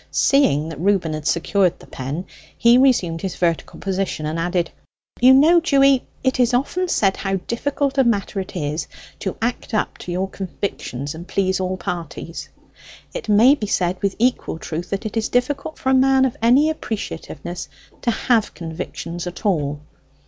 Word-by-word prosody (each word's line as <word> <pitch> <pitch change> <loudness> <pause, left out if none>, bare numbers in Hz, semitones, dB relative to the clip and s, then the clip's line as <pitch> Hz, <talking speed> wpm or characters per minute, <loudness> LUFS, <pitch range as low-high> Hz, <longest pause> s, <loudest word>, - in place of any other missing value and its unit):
Seeing 160 - +3
that 155 -3 -7
Reuben 185 -3 +1
had 155 -1 -4
secured 180 +1 +2
the - - -15
pen, 140 +8 -5 0.3
he 235 +1 +6
resumed 185 -12 +3
his 190 - -3
vertical 170 -2 -1
position, 190 -5 -2
and 155 +2 -2
added, 175 0 0 0.5
"You 255 +2 +7
know, 310 +6 +7
Dewy, 275 -5 +3 0.2
it 260 0 +1
is 245 0 +3
often 355 +8 0
said 195 - +2
how 195 -1 -1
difficult 275 +7 -1
a - - +6
matter 210 -4 0
it 190 - -6
is 155 -1 -2 0.3
to 190 - -4
act 235 -1 -2
up 215 - -1
to 175 - -5
our 190 - +1
convictions 170 -8 -5
and 170 +3 -9
please 190 -1 0
all 185 0 -2
parties. 170 -1 -6 0.6
It - - -6
may 225 +6 +7
be 220 -8 -3
said 180 -2 0
with 200 -1 0
equal 245 -7 0
truth, 170 +2 -5
that 195 +3 -3
it 215 - -4
is 225 - 0
difficult 260 +5 -1
for 265 - -2
a - - +4
man 265 0 +5
of 255 - -1
any 265 +7 +5
appreciativeness 180 - -6 0.3
to - - 0
have 230 -1 +1
convictions 170 +1 -6
at 180 +5 -8
all. 150 -7 0
195 Hz, 175 wpm, -21 LUFS, 170-250 Hz, 0.6 s, You